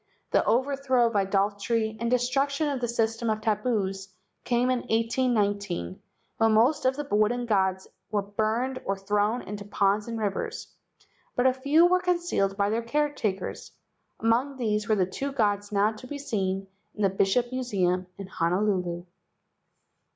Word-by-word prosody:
The - - +3
overthrow 260 +1 +2
of 230 -1 -1
idolatry 205 +3 0
and 235 +1 -1
the - - +6
destruction 275 +4 0
of 275 -3 -2
the 240 - 0
system 225 0 0
of 215 0 0
tabus 210 -3 -1 0.4
came 245 +1 +1
in 255 - +1
1819, 210 - 0 0.4
when 225 -1 +3
most 245 +8 +3
of 260 +1 +3
the 295 0 -5
wooden 215 +4 +2
gods 190 -4 +1 0.2
were 205 0 0
burned 220 +6 -1
or 195 0 -1
thrown 210 +4 0
into 205 +1 -6
ponds 205 +1 +1
and 230 -1 -4
rivers, 205 -3 -3 0.6
but 245 - +1
a 260 - +5
few 285 +6 +4
were 365 +1 +3
concealed 345 - 0
by 200 0 +1
their 225 +1 0
caretakers. 235 -6 -2 0.5
Among 245 +5 +1
these 215 -3 -1
were 215 - +4
the 190 -3 +2
two 270 +10 -4
gods 205 -4 0
now 205 +1 +3
to 220 +3 -11
be 290 - -5
seen 195 -9 -2 0.3
in 210 - -3
the 195 - +4
Bishop 200 +6 +1
Museum* 190 -8 0
in 195 - -6
Honolulu. 180 -1 -1
220 Hz, 160 wpm, -27 LUFS, 200-250 Hz, 0.6 s, the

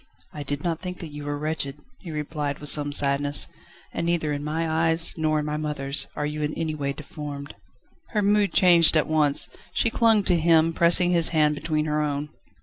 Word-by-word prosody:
"I 150 - -7
did 145 0 -4
not 165 -2 -2
think 180 -1 -6
that 165 -3 -8
you 145 0 -8
were 145 0 -3
wretched," 150 -2 -3 0.2
he 180 - -10
replied 150 -2 -4
with 150 - -3
some 145 -1 +2
sadness, 145 0 +2 0.5
"and - - -3
neither 160 -3 0
in 145 0 -4
my 160 +2 -2
eyes, 165 +1 +1
nor 155 -1 0
in 150 - -2
my 150 0 -3
mother's, 150 -2 0
are 150 - -2
you 150 +1 -4
in 150 0 -2
any 160 -1 -2
way 140 -2 -3
deformed." 145 0 -8 0.6
Her 210 -2 -1
mood 205 0 +2
changed 170 -3 +6
at 155 - +2
once. 150 -2 +1 0.3
She 230 - +1
clung 225 -3 +3
to 175 -3 +2
him, 165 0 +3
pressing 175 +2 +4
his 170 -2 +4
hand 155 -2 +2
between 155 0 -2
her 150 0 -1
own. 145 0 -3
155 Hz, 205 wpm, -24 LUFS, 145-165 Hz, 0.6 s, changed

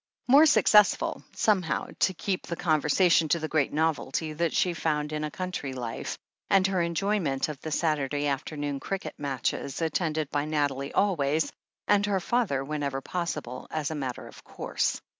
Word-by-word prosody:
More 285 +5 +7
successful, 210 -8 +4
somehow, 190 -7 +1
to 190 - +3
keep 190 +2 -3
the 170 - -3
con 155 -3 +1
versation 165 +1 +3
to 170 - +3
the 155 - -3
great 155 -3 +1
novelty 155 0 -1
that 170 +2 0
she 180 - +1
found 150 -2 -1
in 155 0 -2
a 150 - -2
country 180 -5 -4
life, 120 -3 -5 0.3
and 195 -1 +4
her 190 -2 +1
enjoyment 170 -5 0
of 150 -3 -7
the 160 - -5
Saturday 145 -2 0
after 145 +2 -2
noon 145 -1 -2
cricket 195 +5 -4
matches, 140 -1 -2
attended 160 -2 -1
by 145 0 0
Nathalie 145 -2 -1
always, 160 -6 +1 0.3
and 205 0 +3
her 200 -2 +1
father 185 - 0
whenever 140 -2 -2
possible, 150 -6 -4
as 155 -1 -2
a - - -1
matter 130 -4 -4
of - - -14
course. - - -2
155 Hz, 170 wpm, -27 LUFS, 145-180 Hz, 0.3 s, More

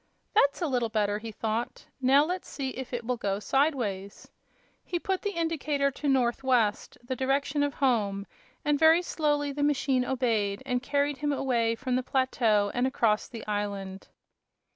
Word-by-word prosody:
"That's 290 -5 +3
a - - +1
little 245 -4 0
better," 210 -1 0
he 225 +1 -7
thought. 225 +2 -3 0.2
"Now 270 +3 +5
let's 360 +3 -4
see 270 -2 -3
if 260 -1 -7
it 240 -2 -4
will 250 +1 -1
go 200 -3 -1
sidewise." 210 -6 -1 0.5
He 350 - -2
put 380 +2 -2
the 405 -4 -3
indicator 295 -4 0
to 290 +2 -5
"north 255 -1 +1
west," 240 -5 +1
the 255 +2 -3
direction 275 +3 0
of 285 -1 0
home 210 -7 +1 0.4
and 295 -1 +2
very 325 +2 +6
slowly 295 -4 0
the 290 +1 -4
machine 275 -3 +2
obeyed 230 -5 0
and 250 -2 -1
carried 285 +2 0
him 295 +1 -1
away 235 -5 +1
from 255 +1 -2
the 255 - +1
plateau 235 -6 +1
and 250 +1 +1
across 225 -5 +1
the 230 -2 -9
island. 200 -2 -4
260 Hz, 170 wpm, -28 LUFS, 225-285 Hz, 0.5 s, very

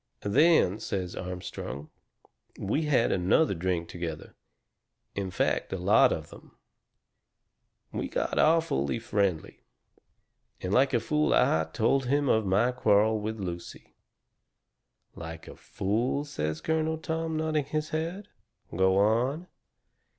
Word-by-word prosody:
"Then," 120 - +4
says 95 -4 -4
Armstrong, 90 -6 -6 0.7
"we 140 +11 -1
had 140 -6 +2
another 95 - +2
drink 85 -1 -2
together. 85 -2 -6 0.8
In 100 -1 -3
fact, 90 - -1
a 95 - -2
lot 105 +8 +4
of 80 -2 -4
them. - - -15 1.3
We - - -3
got - - -2
awfully 155 - +2
friendly. 100 -7 -1 1.0
And 90 +1 -3
like 130 +2 +3
a - - +3
fool 150 +6 +1
I 80 0 +3
told 130 +6 +1
him 140 +1 +1
of 110 -2 +2
my 105 +7 +3
quarrel 110 -3 +3
with 110 +1 -4
Lucy." 85 -3 -7 1.2
"LIKE 80 -1 -9
a - - -10
fool," 120 +8 -2
says 80 - -3
Colonel 160 0 0
Tom, 160 0 -3
nodding 155 -2 0
his 155 +2 -3
head. 170 +6 -3 0.5
"Go 95 +1 +3
on." 120 - +2
110 Hz, 120 wpm, -28 LUFS, 90-150 Hz, 1.3 s, Then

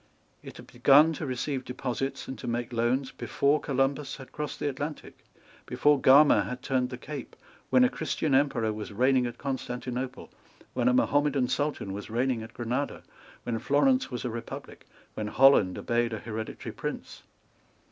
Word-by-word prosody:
It - - -11
had - - -11
begun 145 +6 +5
to 155 -1 -5
receive 130 +1 -2
deposits 130 +1 -4
and 130 - -5
to - - -7
make 120 +1 -3
loans 125 +3 0
before 145 +2 +1
Columbus 135 0 -1
had 135 -2 -12
crossed 150 0 -5
the - - -1
Atlantic, 145 +2 -6 0.4
before 145 -2 +3
Gama 145 +3 +7
had 125 0 -6
turned 130 -2 0
the 125 - -6
Cape, 140 +1 -8 0.3
when 255 - +5
a 250 - +5
Christian 160 - -2
Emperor 130 -5 +2
was 105 0 -6
reigning 125 +3 +2
at 120 - -7
Constantinople, 125 -1 -5 0.4
when 125 -1 0
a 125 - +4
Mahomedan 145 -1 +2
Sultan 145 -9 -2
was 100 +2 -7
reigning 120 +1 0
at 110 0 -10
Granada, 125 +4 -3 0.4
when 115 -2 -2
Florence 255 - +2
was 125 0 -5
a 120 - -2
Republic, 115 +1 -8 0.3
when 105 - -4
Holland 130 -6 +5
obeyed 120 0 0
a - - -2
hereditary 110 0 -6
Prince. - - -6
130 Hz, 165 wpm, -28 LUFS, 120-140 Hz, 0.4 s, Gama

